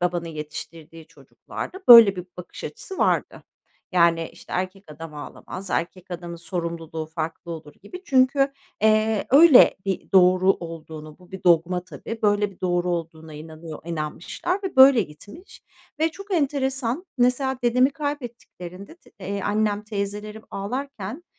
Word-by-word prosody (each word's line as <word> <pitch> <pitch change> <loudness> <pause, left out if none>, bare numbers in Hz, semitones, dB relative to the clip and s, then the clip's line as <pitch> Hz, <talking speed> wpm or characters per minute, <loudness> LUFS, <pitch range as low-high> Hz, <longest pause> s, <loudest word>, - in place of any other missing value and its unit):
babanın 175 -1 -1
yetiştirdiği 155 +1 -9
çocuklarda 375 - -9
böyle 230 -5 +10
bir 180 0 -6
bakış 180 - -10
açısı 380 - -8
vardı. - - 0 0.5
Yani, 170 -2 +3
işte, - - -14
"Erkek 185 +2 -3
adam 155 +1 -9
ağlamaz, 180 +5 -9
erkek 180 +2 -3
adamın 170 -1 -6
sorumluluğu 165 -2 -5
farklı 160 +2 -6
olur." 155 -2 -10
gibi 360 - -10
çünkü, 275 0 +3 0.3
eee, 215 0 +2
öyle 285 -1 +7
bir 195 0 -4
doğru 185 0 +5
olduğunu 160 -2 -9
bu 180 +1 -20
bir 190 -1 -9
dogma 175 +1 +3
tabii, 185 +7 -8
böyle 205 0 +2
bir 190 - -20
doğru 175 -1 0
olduğuna 160 -2 -5
inanıyor 155 0 -9
inanmışlar 170 - -4
ve 375 -6 -5
böyle 265 -3 +8
gitmiş. 205 - -13 0.4
Ve 320 - +3
çok 395 +3 -6
enteresan, 270 0 -1
mesela 255 +1 +1
dedemi 250 +3 +3
kaybettiklerinde 245 - -7
t - - -23
eee, 200 +2 -4
annem 210 0 0
teyzelerim 210 +1 -5
ağlarken, 250 - -5
190 Hz, 135 wpm, -23 LUFS, 170-250 Hz, 0.5 s, böyle